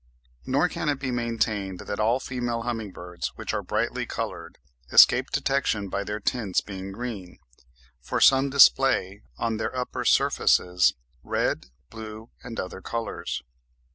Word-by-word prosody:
Nor 140 +6 +3
can 170 -2 -3
it 145 - +1
be 135 -2 -3
maintained 110 -5 -1
that 100 - -5
all 115 +4 +2
female 120 -3 -3
humming 115 -3 -3
birds, 90 -1 -6
which - - -4
are - - -1
brightly - - -2
coloured, - - -5 0.3
escape - - +7
detection 110 -7 0
by 100 +2 -2
their 105 +1 -4
tints 110 -3 0
being 95 -1 -7
green, 105 -4 -6 0.6
for 65 - -3
some 135 +1 +5
display 135 -7 +4 0.2
on 115 -1 -1
their 130 - -3
upper 125 - -3
surfaces 90 0 +3 0.3
red, - - -1 0.2
blue, 110 0 -9
and 115 -2 -6
other 95 +1 -5
colours. 115 +2 -4
115 Hz, 140 wpm, -26 LUFS, 100-125 Hz, 0.6 s, escape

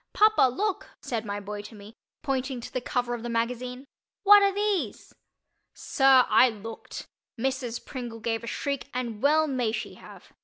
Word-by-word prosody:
"Papa, 430 -11 +5
look," 400 - -3
said 230 -2 -4
my 205 0 -3
boy 205 +1 -6
to 210 +2 -12
me, 205 +1 -12 0.3
pointing 265 -2 -2
to 235 - -9
the 255 - -1
cover 245 0 -1
of 240 - -4
the 240 - -5
magazine. 250 +3 -2 0.4
"What 410 0 +9
are 400 0 +4
these?" 390 - -2 0.6
Sir, 270 -2 +4
I 255 - +6
looked. 225 0 -8 0.3
Mrs. 260 -2 -2
Pringle 240 -3 -6
gave 225 0 -2
a - - -7
shriek, 280 +4 -3
and 235 -4 -3
well 310 +3 +4
may 255 -6 -1
she 215 - -4
have. - - -15
250 Hz, 175 wpm, -27 LUFS, 225-275 Hz, 0.6 s, What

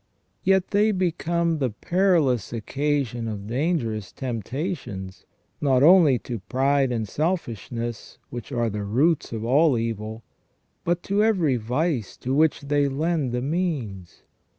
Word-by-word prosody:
Yet 190 -1 +2
they 210 +2 +3
become 170 -3 0
the 130 -3 +1
perilous 160 - +1
occasion 125 0 -1
of 105 -2 -5
dangerous 120 - -1
temptations, 120 - -5 0.3
not 135 -2 +3
only 160 -5 +7
to 120 -3 -4
pride 135 +5 +1
and 115 -3 -2
selfishness, 120 - -3
which 120 +2 -7
are 120 -3 0
the 105 0 -3
roots 135 +11 +1
of 115 -1 -4
all 140 +2 +4
evil, 110 0 -4 0.6
but 175 +1 0
to 200 +2 +1
every 175 - +2
vice 125 - -1
to 130 - -3
which 155 +2 +3
they 145 0 +1
lend 150 -1 0
the 125 0 -2
means. 135 - -3
135 Hz, 130 wpm, -24 LUFS, 115-165 Hz, 0.6 s, only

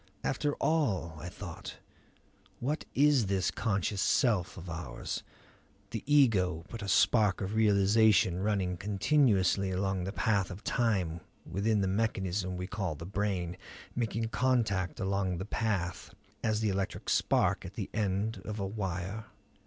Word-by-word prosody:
After 145 -1 0
all, 105 - 0
I 90 - -6
thought, - - -8 0.8
what 145 +6 -2
is 140 -6 +4
this 95 -1 +1
conscious 100 -2 -1
self 105 - +2
of 90 0 -8
ours, 80 -8 -5 0.7
the 115 - -4
ego, 95 - +4
but 115 - -7
a 100 - -5
spark 105 0 +4
of 95 +1 -3
realization 105 -2 +4
running 95 -3 0
continuously 100 - +2
along 95 0 -1
the 95 - -3
path 100 -4 +1
of 95 +2 -8
time 95 -9 0 0.2
within 100 +5 +1
the 95 - +1
mechanism 95 -3 -1
we 90 - -3
call 95 -4 -3
the 85 - -8
brain; 95 -3 -2 0.4
making 115 -1 -1
contact 115 -8 +1
along 95 -2 0
that 95 +4 -6
path 95 -7 -1 0.3
as 110 -1 +1
the 110 - +1
electric 95 0 -3
spark - - +2
at - - -9
the - - -3
end 105 +2 -1
of 105 0 -5
a 100 - -1
wire? 95 +1 -4
100 Hz, 145 wpm, -31 LUFS, 95-110 Hz, 0.8 s, is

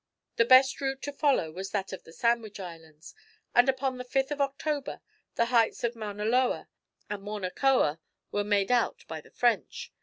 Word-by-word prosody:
The 230 - +5
best 260 +3 +6
route 270 -1 -2
to 285 - -4
follow 275 - +1
was 190 +4 -6
that 195 -2 -3
of 190 - -8
the - - -13
Sandwich 225 +3 0
Islands, 165 -3 -10 0.4
and 245 +2 +5
upon 265 -1 -1
the - - -4
5th 270 +3 -1
of 290 -1 -2
October, 280 +1 -2 0.4
the 235 - +2
heights 230 -2 +3
of 235 0 0
Mauna 210 -2 -5
Loa, 250 +3 +1 0.4
and 210 -1 -5
Mauna 205 -2 -4
Koa 250 - +2 0.3
were 205 - 0
made 205 +1 +1
out 245 -2 +1
by 160 -1 -6
the - - -19
French. 245 - -1
235 Hz, 185 wpm, -28 LUFS, 195-265 Hz, 0.4 s, best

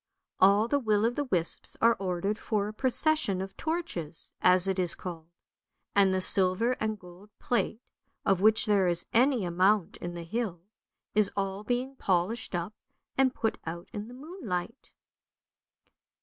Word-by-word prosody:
All 200 +3 +5
the 285 +4 +1
will 215 -4 +1
o' 230 - +2
the 290 +4 -3
wisps 175 -9 -1
are 230 0 +4
ordered 195 +2 -2
for 205 -2 -1
a 210 - -6
procession 260 -3 +3
of 195 +1 -6
torches, 315 - -4
as 180 +1 +4
it 190 0 0
is 175 -2 0
called; 165 -3 -8 0.7
and 195 -1 +5
the 190 0 0
silver 190 +5 +3
and 215 0 -1
gold 180 +2 -15
plate, 240 -1 -1 0.4
of 190 -2 +2
which 220 +1 +4
there 200 -3 +3
is 175 0 +2
any 245 -3 +3
amount 185 +2 +2
in 175 0 -6
the 170 - -6
hill, 185 -1 -3 0.5
is 210 -1 +3
all 195 +1 -2
being 250 +4 -2
polished 190 +3 -1
up 175 +4 -3 0.4
and 265 -1 +2
put 225 -1 -1
out 170 +1 -6
in 210 0 -5
the 245 - -11
moonlight." 260 - -6
200 Hz, 160 wpm, -29 LUFS, 180-235 Hz, 0.7 s, All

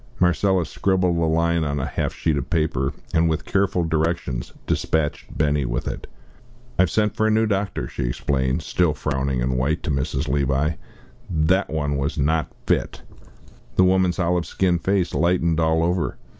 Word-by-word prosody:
Marcella 90 0 +2
scribbled 90 0 +1
a 85 -1 +1
line 85 +1 +2
on 70 -1 -1
a 65 - -2
half - - -2
sheet 80 -2 0
of 70 - -3
paper, 75 -5 0 0.2
and, 80 0 +3
with 80 +1 -2
careful 95 -3 +1
directions, 80 -6 -1
despatched 80 -2 -1
Benny 75 -2 +2
with - - -2
it. - - -5 0.7
"I - - +8
have 95 - +3
sent 105 +3 +1
for 110 - +2
a - - +3
new 110 +1 +3
doctor," 100 -1 -1
she - - -4
explained, 65 +4 -1
still 85 -3 +1
frowning 65 -3 -1
and 65 0 0
white, 75 +6 0
to - - -1
Mrs. 70 +1 -1
Levi. 70 +2 +1 0.6
"That 90 +3 +2
one 75 -2 -1
was 70 +4 -2
not 80 +2 +1
fit." - - -1 0.7
The 95 - +5
woman's 90 -1 +3
olive 90 -1 0
skinned 90 -2 0
face 95 -3 +1
lightened 85 +1 +2
all 80 0 +2
over. 85 -2 0
80 Hz, 170 wpm, -23 LUFS, 70-90 Hz, 0.7 s, I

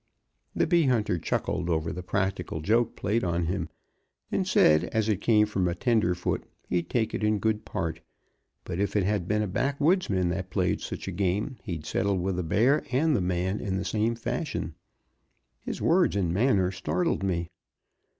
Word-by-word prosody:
'" - - -45
The - - +2
bee 170 -3 +3
hunter 105 -8 +1
chuckled 90 +2 -2
over 80 -1 0
the 90 - -5
practical 95 -3 -2
joke 115 +7 +2
played 110 +4 0
on 85 -1 0
him, 85 -1 -2 0.6
and - - 0
said 75 +2 +5
as 110 -1 -1
it 105 -3 0
came 105 -2 +4
from 95 -4 0
a 85 - -1
tenderfoot 90 -5 +1 0.2
he'd 85 -1 -1
take 115 -3 0
it - - -2
in 105 0 +2
good 110 +1 -1
part; 80 -3 -3 0.6
but 85 - -5
if 100 +1 -1
it 105 - +3
had 100 -2 0
been 105 +1 +1
a - - -2
backwoodsman 135 - +1
that 90 +1 -3
played - - 0
such - - -6
a - - -2
game 100 +7 -1
he'd 85 -5 -5
settle 100 +4 0
with 90 0 -1
the - - 0
bear 115 - +2
and 145 +4 +2
the 105 - +1
man 90 +2 -1
in 95 -2 -2
the 95 - -3
same 110 +2 0
fashion. 120 - -3 0.9
His - - -5
words 175 - +3
and 90 -4 0
manner 100 -3 +2
startled 95 - -1
me. 85 -3 -1
100 Hz, 185 wpm, -27 LUFS, 90-115 Hz, 0.9 s, said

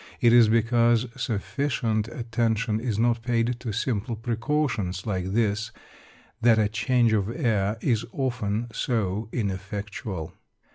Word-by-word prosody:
It 120 -1 +5
is 120 -3 +7
because 115 +1 +3
sufficient 115 -1 -1
attention 115 -2 -1
is 115 -3 -2
not 120 0 +2
paid 120 0 0
to 125 -3 -4
simple 115 +1 -2
precautions 115 -5 -1
like 95 -3 -2
this 110 0 0 0.7
that 115 -1 +5
a 110 -1 +3
change 120 0 +2
of 105 -1 +1
air 110 -6 0
is 115 -4 +1
often 120 -4 -2
so 110 -3 -1
ineffectual. 100 -4 -4
115 Hz, 125 wpm, -26 LUFS, 105-120 Hz, 0.7 s, is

